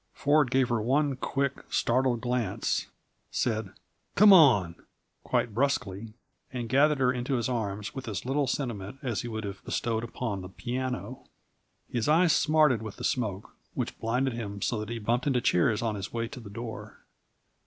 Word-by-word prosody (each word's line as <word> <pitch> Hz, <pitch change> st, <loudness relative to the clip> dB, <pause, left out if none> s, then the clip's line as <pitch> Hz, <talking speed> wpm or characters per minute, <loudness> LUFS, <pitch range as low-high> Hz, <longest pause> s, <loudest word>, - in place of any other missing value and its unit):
Ford 145 Hz, -1 st, +3 dB
gave 130 Hz, -1 st, +2 dB
her 120 Hz, -2 st, +1 dB
one 140 Hz, +4 st, +1 dB
quick, 140 Hz, +1 st, -2 dB
startled 125 Hz, -1 st, +1 dB
glance, 120 Hz, -4 st, -1 dB, 0.4 s
said 110 Hz, -4 st, -1 dB, 0.5 s
"Come 205 Hz, 0 st, +8 dB
on," 120 Hz, -, +6 dB, 0.5 s
quite 115 Hz, -, 0 dB
brusquely, 115 Hz, -5 st, -1 dB, 0.4 s
and 125 Hz, -2 st, -4 dB
gathered 145 Hz, +5 st, +4 dB
her 130 Hz, -1 st, +2 dB
into 125 Hz, +2 st, -2 dB
his 120 Hz, -2 st, 0 dB
arms 105 Hz, -4 st, -3 dB
with 135 Hz, -2 st, -7 dB
as 105 Hz, -2 st, -4 dB
little 135 Hz, +2 st, +1 dB
sentiment 120 Hz, -5 st, -3 dB
as 120 Hz, -5 st, -1 dB
he -, -, -6 dB
would 110 Hz, -1 st, -4 dB
have 100 Hz, -1 st, -7 dB
bestowed 115 Hz, -1 st, -1 dB
upon 115 Hz, -4 st, -4 dB
the 90 Hz, -, -8 dB
piano. 125 Hz, +4 st, -4 dB, 0.6 s
His 120 Hz, +3 st, -1 dB
eyes 165 Hz, +2 st, +5 dB
smarted 150 Hz, -6 st, +3 dB
with 110 Hz, -2 st, -7 dB
the -, -, -9 dB
smoke, 105 Hz, -6 st, -2 dB, 0.2 s
which -, -, -3 dB
blinded 125 Hz, +3 st, 0 dB
him 105 Hz, -3 st, -5 dB
so 115 Hz, +2 st, -1 dB
that 105 Hz, 0 st, -5 dB
he 115 Hz, -, -3 dB
bumped 120 Hz, +5 st, 0 dB
into 130 Hz, -3 st, +3 dB
chairs 110 Hz, +1 st, +2 dB
on 115 Hz, -2 st, 0 dB
his 100 Hz, -2 st, -5 dB
way 115 Hz, 0 st, -2 dB
to -, -, -9 dB
the 110 Hz, -4 st, -10 dB
door. 115 Hz, +2 st, -7 dB
120 Hz, 175 wpm, -28 LUFS, 110-135 Hz, 0.6 s, Come